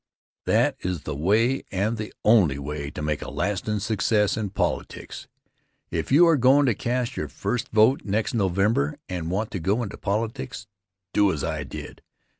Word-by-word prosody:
That - - +2
is 90 -5 -3
the 75 - -4
way 110 - +2
and 100 +4 0
the 110 -1 -5
only 100 -11 +5
way 70 0 -5
to' 75 - -6
make 75 -1 -1
a - - -6
lastin' 105 +1 -1
success 105 0 +1
in 110 -2 -2
politics. 95 - -3 0.6
If - - -3
you 160 +6 +7
are 165 -2 +5
goin' 135 +3 +5
to 125 - +3
cast 120 +3 -2
your 75 - -3
first 105 - -3
vote 110 +5 +4
next 105 +2 -1
November 95 -6 +1
and 85 -3 -4
want 105 +5 -2
to 95 - -3
go 100 +8 0
into 105 - -6
politics, 105 -5 -3 0.5
do 100 -2 +4
as 75 -6 -3
I - - -2
did. - - -9
105 Hz, 175 wpm, -25 LUFS, 90-115 Hz, 0.6 s, you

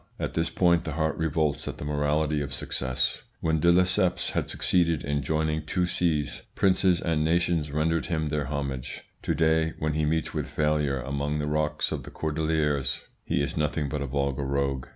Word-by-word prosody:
At - - -3
this 85 0 0
point 85 0 +3
the 80 -3 -4
heart 80 0 0
revolts 80 -2 0
at - - -4
the - - -6
morality 75 +1 +1
of 70 - -3
success. 65 -1 -1 0.2
When 80 -1 +1
de 85 +3 +5
Lesseps 90 +1 +2
had - - -1
succeeded 85 -3 +2
in 70 0 -1
joining 80 +1 0
two 90 +3 0
seas 80 -4 0
princes 95 -2 +3
and 80 -2 +1
nations 85 -2 +1
rendered 80 +2 0
him 80 -3 -1
their 75 -1 -1
homage; 70 -2 -4 0.2
to - - -1
day, 80 0 +2
when 75 0 -1
he 80 0 +1
meets 80 0 0
with - - -3
failure 75 -3 +1
among 70 +3 -2
the 75 - -1
rocks 75 0 0
of - - -2
the - - -10
Cordilleras, 75 -3 0 0.2
he 70 - 0
is 70 - -3
nothing 75 -1 0
but 75 +1 -3
a 70 - -2
vulgar 70 0 -1
rogue. 70 -1 -1
75 Hz, 190 wpm, -27 LUFS, 70-80 Hz, 0.2 s, de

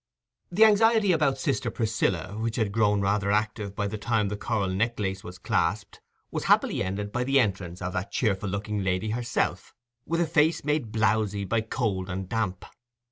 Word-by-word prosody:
The 210 +5 +6
anxiety 220 -1 +4
about 150 -5 +2
sister 135 -2 -1
Priscilla, 100 -5 -1
which 115 +1 -2
had 110 -4 0
grown 105 -1 +2
rather 100 0 +1
active 105 -1 -1
by 100 - -1
the 105 +1 -4
time 110 -2 0
the 105 - -3
coral 100 -2 -1
necklace 95 -2 -1
was 90 +1 -9
clasped, - - -1 0.3
was - - -3
happily - - +3
ended 100 +2 -3
by 125 - -1
the 135 +2 +3
entrance 95 -6 -1
of 90 0 -3
that 95 +1 -3
cheerful 100 -4 0
looking 100 +1 -3
lady 95 +3 -1
herself, 120 +1 -2 0.3
with 165 +2 0
a 170 - +3
face 160 0 +2
made 150 -6 -1
blowsy 105 -2 +1
by 115 +3 +1
cold 110 -5 -2
and 95 0 -4
damp. 100 -4 -2
105 Hz, 180 wpm, -27 LUFS, 100-120 Hz, 0.3 s, The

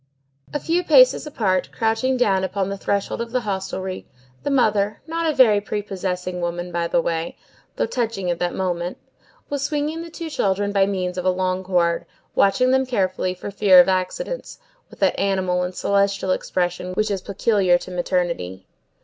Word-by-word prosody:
A 295 - -2
few 340 +5 0
paces 275 -3 +5
apart, 195 -10 0
crouching 225 +4 0
down 195 -6 +2
upon 190 +1 -1
the 200 - -4
threshold 200 +3 -1
of 235 0 -5
the 250 0 0
hostelry, 190 -2 -4 0.3
the - - -2
mother, 215 -6 +2
not 330 0 -1
a - - -6
very 215 -6 +5
prepossessing 185 -3 -3
woman, 175 +1 -3
by 170 0 -1
the 260 - +2
way, 165 -7 -2 0.4
though - - +1
touching 225 -7 -2
at 170 - -3
that 175 0 -1
moment, 175 -1 -2 0.5
was 285 -1 -3
swinging 300 +2 -1
the 335 - -8
two 330 -1 -7
children 200 -4 0
by 195 -1 +3
means 185 -2 -2
of 180 - -5
a - - +4
long 185 0 -1
cord, 175 -2 +1 0.3
watching 255 +6 +3
them 265 0 +2
carefully, 185 -5 0
for 195 +2 -7
fear 200 -2 +6
of 180 - +7
accidents, 190 - -2 0.3
with - - -15
that - - +2
animal 190 -2 +1
and 180 0 -3
celestial 200 -1 +1
expression 180 0 -1
which 215 +2 0
is 195 -2 -2
peculiar 195 -2 +2
to 185 - -10
maternity. 175 - -2
195 Hz, 175 wpm, -22 LUFS, 180-235 Hz, 0.5 s, of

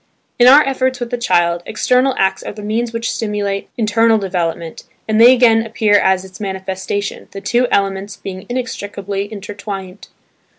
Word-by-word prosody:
In 245 - +7
our 280 +3 +7
efforts 260 -1 0
with 240 0 -5
the 245 - -1
child, 175 -6 +1
external 250 +4 +1
acts 190 0 +1
are - - -6
the 210 0 -10
means 225 +3 -1
which 230 0 -2
stimulate 205 -2 -3
internal 225 0 +3
development, 170 -4 -3 0.2
and 220 0 +2
they 240 +2 +9
again 235 -3 +4
appear 220 -2 0
as 190 -2 +3
its 185 0 -13
manifestation, 190 0 -4
the 195 - -6
two 240 +5 +1
elements 195 +1 -1
being 185 -1 -8
inextricably 205 -5 -4
intertwined. 200 -2 -7
205 Hz, 160 wpm, -17 LUFS, 195-230 Hz, 0.2 s, they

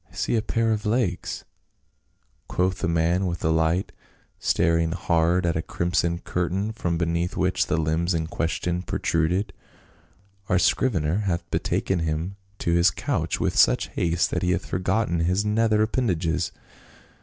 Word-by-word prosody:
" - - -28
I - - -19
see - - 0
a 110 - +2
pair 115 +1 0
of 105 -1 -1
legs," 105 -5 -1 1.0
quoth 95 -1 0
the - - -1
man 85 +3 +1
with 85 -1 -3
the 80 - +1
light, 80 +4 +1 0.5
staring 85 -1 +2
hard 85 0 +1
at 85 - +1
a 80 - 0
crimson 85 0 0
curtain 90 +5 -2
from 85 -6 -2
beneath 85 +1 -1
which - - +1
the - - 0
limbs 80 +3 0
in 80 -1 -1
question 85 +2 -2
protruded. 90 +2 0 0.5
" 95 0 -34
Our 90 - +3
scrivener 90 -5 +2
hath 85 -2 -1
betaken 95 -2 0
him 80 +4 -2 0.2
to 85 - 0
his 85 0 +5
couch - - -2
with - - 0
such - - +4
haste 85 0 0
that - - -1
he 90 0 +2
hath - - -2
forgotten 90 -1 0
his 90 +5 +1
nether 110 0 +2
appendages." 90 -7 0
85 Hz, 160 wpm, -25 LUFS, 85-95 Hz, 1.0 s, his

